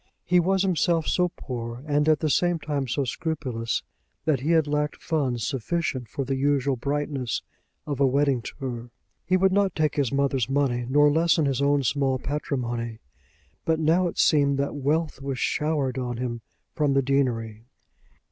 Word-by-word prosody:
He 180 0 +4
was 190 +2 +2
himself 170 -3 +1
so 180 -1 +2
poor, 120 -4 -6
and 150 0 +2
at 155 -2 +3
the 155 - +1
same 175 +5 +2
time 145 -4 -3
so 140 +3 0
scrupulous, 130 -5 -2 0.4
that 150 -5 +2
he 140 +5 -3
had 165 -2 +4
lacked 150 0 -1
funds 135 -8 -1
sufficient 135 -1 -2
for 135 - -3
the 135 - -1
usual 140 0 +1
brightness 140 -1 -2 0.4
of 145 -2 -3
a 140 - +5
wedding 140 -1 +2
tour. 120 -1 -6 0.3
He 185 - +2
would 190 +1 +3
not 200 -2 +2
take 155 -2 0
his 140 -4 +1
mother's 135 -3 +1
money, 130 -3 0
nor 145 +2 +5
lessen 160 0 +3
his 135 -1 0
own 140 0 +3
small 135 0 +1
patrimony; 120 -5 -3 0.7
but 160 -1 +1
now 165 +3 +3
it 170 - -6
seemed 140 -3 +3
that 140 0 -1
wealth 150 +1 -1
was 135 -1 -3
showered 145 -1 0
on 120 -2 -3
him 120 -1 -3 0.3
from 145 -2 +1
the 135 - +3
deanery. 115 -5 -1
140 Hz, 170 wpm, -25 LUFS, 130-155 Hz, 0.7 s, a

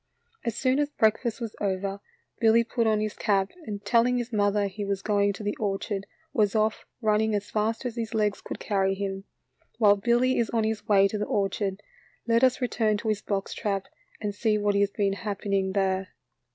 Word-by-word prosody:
As 235 -2 -2
soon 260 +1 +2
as 295 0 +1
breakfast 225 -2 +1
was 230 -3 -5
over, 195 0 -1 0.4
Billy 230 +1 +5
put 230 0 0
on 215 -1 +3
his 215 -1 -2
cap, 195 -3 +1 0.2
and 205 -1 -5
telling 245 +1 +3
his 240 0 -4
mother 205 0 +2
he 200 +1 -4
was 200 -1 -2
going 205 -1 +2
to 200 - -8
the 205 0 -1
orchard, 195 -1 -2 0.3
was 210 -1 +2
off, 215 0 0
running 215 0 +2
as 205 0 -3
fast 220 +3 -1
as 240 -1 -4
his 225 0 -3
legs 210 -2 +1
could - - -7
carry 195 -2 +1
him. 195 0 -4 0.5
While 205 -3 +5
Billy 240 +5 +2
is 230 - +1
on 230 -1 +1
his 215 -1 -2
way 200 -1 +5
to 210 +1 -4
the 210 - 0
orchard, 195 0 -1 0.4
let 230 +1 +3
us 255 0 +4
return 220 -4 +1
to 220 - -3
his 215 -1 0
box 195 -1 -2
trap 200 -3 -2 0.3
and 205 -1 -3
see 215 +1 +1
what 205 -1 +1
has 200 0 +3
been 200 -1 0
happening 200 -2 -2
there. 190 -1 0
210 Hz, 200 wpm, -27 LUFS, 200-225 Hz, 0.5 s, Billy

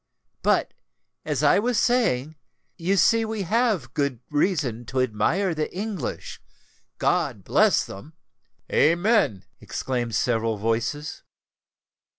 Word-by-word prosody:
But, - - +1 0.5
as 150 -2 -1
I 145 - +5
was 235 0 +1
saying, 160 - +1 0.4
you 185 +4 0
see 230 +4 +4
we 220 -2 -3
have 205 - 0
good 140 -4 -1
reason 145 - 0
to 130 +3 -2
admire 130 - +1
the 155 -1 -3
English—God 195 - -4
bless - - +3
them!" 120 +12 -11 0.6
"Amen!" 170 - +3
exclaimed 120 -4 -3
several 115 -1 0
voices. 115 +8 -2
150 Hz, 105 wpm, -24 LUFS, 120-200 Hz, 0.6 s, I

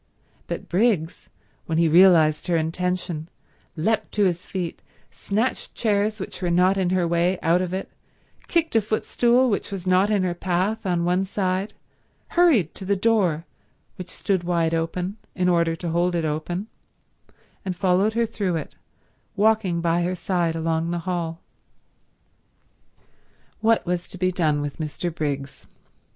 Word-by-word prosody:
But - - -5
Briggs, 180 -4 0 0.4
when 160 - -1
he 165 0 +4
realized 165 -2 +5
her 175 -2 +2
intention, 170 0 -2 0.5
leapt 215 +8 0
to 210 - +2
his 180 -1 -1
feet, 180 -3 -4 0.3
snatched 220 +6 -2
chairs 215 -1 0
which 190 - -7
were 180 - 0
not 180 +3 +4
in 190 -2 0
her 180 -2 +1
way 170 +2 +1
out 170 +3 +3
of 180 -1 -3
it, 190 +1 -3 0.6
kicked 330 -6 0
a 225 - +5
footstool 240 +4 +2
which 205 -4 -1
was 190 -2 -5
not 185 +2 +3
in 205 -3 +2
her 180 -1 0
path 190 +5 -1
on 175 -2 +1
one 180 +2 +2
side, 190 0 -2 0.5
hurried 295 - +3
to - - -10
the 200 +2 +1
door, 185 -6 +1 0.5
which 180 -1 -7
stood 190 -3 -1
wide 170 -2 +1
open, 175 +4 -2 0.2
in 180 -1 +1
order 170 -2 +2
to 170 +1 -5
hold 175 +2 +1
it 165 -2 0
open, 160 +5 -3 1.0
and 185 -2 -3
followed 190 +4 +2
her 230 +1 +2
through 205 -5 -2
it, 160 - -5 0.6
walking 210 -5 +2
by 170 +1 +1
her 180 +1 -1
side 175 -2 -1
along 165 0 -1
the 170 -1 -3
hall. 170 -3 -3 2.2
What 225 +1 +2
was 180 0 -2
to - - -9
be 185 0 +1
done 155 -5 +1
with 145 +1 -5
Mr. 155 +2 -3
Briggs? 140 -3 -4
180 Hz, 155 wpm, -24 LUFS, 170-195 Hz, 2.2 s, realized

